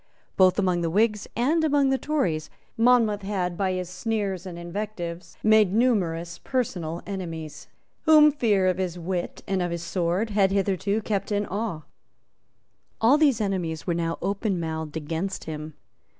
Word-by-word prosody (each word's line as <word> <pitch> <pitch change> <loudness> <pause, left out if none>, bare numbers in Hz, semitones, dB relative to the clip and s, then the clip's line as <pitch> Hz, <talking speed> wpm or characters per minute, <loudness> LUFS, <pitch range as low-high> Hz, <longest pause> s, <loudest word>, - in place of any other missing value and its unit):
Both 185 -1 +5
among 185 -3 +1
the 165 - 0
Whigs 210 +3 +1
and 300 +8 +2
among 285 -3 +3
the 265 - +1
Tories 180 - -1 0.3
Monmouth 230 -3 +3
had, 190 -3 -2
by 190 +1 0
his 185 -1 -3
sneers 195 -1 -3
and 175 -2 -7
invectives, 175 -1 -6
made 215 -3 +5
numerous 175 -8 +1
personal 175 -10 -2
enemies, 165 -6 -6 0.4
whom 305 -2 +7
fear 215 -9 +2
of 185 0 +1
his 180 -2 -2
wit 175 +1 -4
and 195 -2 0
of 175 - 0
his 170 0 -4
sword 180 +5 -1
had 200 -2 +3
hitherto 200 +2 0
kept 200 -1 -2
in 205 0 +1
awe. 200 -6 -3 1.2
All 250 +7 +5
these 280 -7 +4
enemies 180 -6 -2
were 175 - 0
now 165 0 -1
openmouthed 165 -7 -2
against 165 +5 -3
him. 155 -1 -7
190 Hz, 150 wpm, -25 LUFS, 170-215 Hz, 1.2 s, whom